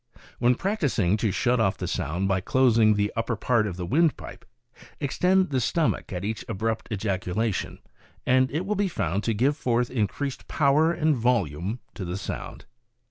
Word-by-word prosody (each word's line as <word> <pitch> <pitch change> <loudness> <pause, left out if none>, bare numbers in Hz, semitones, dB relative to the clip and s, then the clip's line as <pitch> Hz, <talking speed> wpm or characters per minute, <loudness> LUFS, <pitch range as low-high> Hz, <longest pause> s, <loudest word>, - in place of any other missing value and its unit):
"When 125 +1 +4
practicing 140 - 0
to 110 -1 0
shut 120 +5 +1
off 100 -2 +1
the 90 - -4
sound 90 +1 -2
by 95 -1 +1
closing 115 -2 +4
the 105 0 0
upper 115 +1 -1
part 110 0 +1
of 90 -3 -5
the 90 - -4
windpipe, 155 - 0 0.5
extend 185 +5 +2
the 130 -2 +1
stomach 155 +2 0
at 90 0 -4
each 110 +1 -3
abrupt 110 +1 -2
ejaculation, 100 +1 -2 0.5
and 130 +1 +3
it 160 +6 -2
will 210 - 0
be 205 -1 +1
found 100 - -2
to 115 - 0
give 135 +7 +2
forth 120 -4 0
increased 130 +4 -2
power 150 +3 +3
and 160 -3 +1
volume 110 - 0
to 100 - -6
the 90 +1 -4
sound. 100 - -6
115 Hz, 170 wpm, -26 LUFS, 100-140 Hz, 0.5 s, When